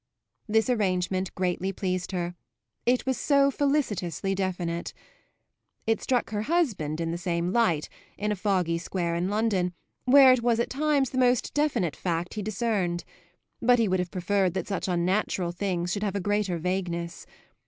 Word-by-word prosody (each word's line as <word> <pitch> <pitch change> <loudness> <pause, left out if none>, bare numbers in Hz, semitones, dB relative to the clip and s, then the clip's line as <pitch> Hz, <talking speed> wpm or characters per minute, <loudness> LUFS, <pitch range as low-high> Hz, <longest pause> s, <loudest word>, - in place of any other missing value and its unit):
This 220 +1 +2
arrangement 185 -5 0
greatly 185 +1 -1
pleased 185 -1 -2
her; 175 -2 -2 0.5
it 250 +1 +3
was 260 -3 0
so 280 -1 +4
felicitously 210 - 0
definite. 180 -3 -3 0.9
It 225 0 +1
struck 250 -3 0
her 210 -1 -1
husband 215 - 0
in 165 -1 -1
the 170 - -3
same 175 0 -1
light, 175 -11 +2 0.3
in 210 +1 -1
a - - 0
foggy 185 -4 0
square 170 -1 -2
in 175 +2 -1
London, 200 -4 0 0.3
where 260 0 +8
it 255 - +1
was 235 -1 +2
at 235 - -1
times 285 -1 +1
the 260 - -1
most 250 -1 +2
definite 290 - +1
fact 175 -1 -2
he 215 - -3
discerned; 200 -4 -1 0.6
but 245 +1 +5
he 230 -2 +2
would 185 -1 +1
have 180 -1 -2
preferred 190 0 0
that 185 - -2
such 195 -1 -2
unnatural 180 0 0
things 180 -1 -2
should 205 - -2
have 205 -2 -1
a - - 0
greater 205 -2 0
vagueness. 170 -1 -3
195 Hz, 165 wpm, -27 LUFS, 175-230 Hz, 0.9 s, where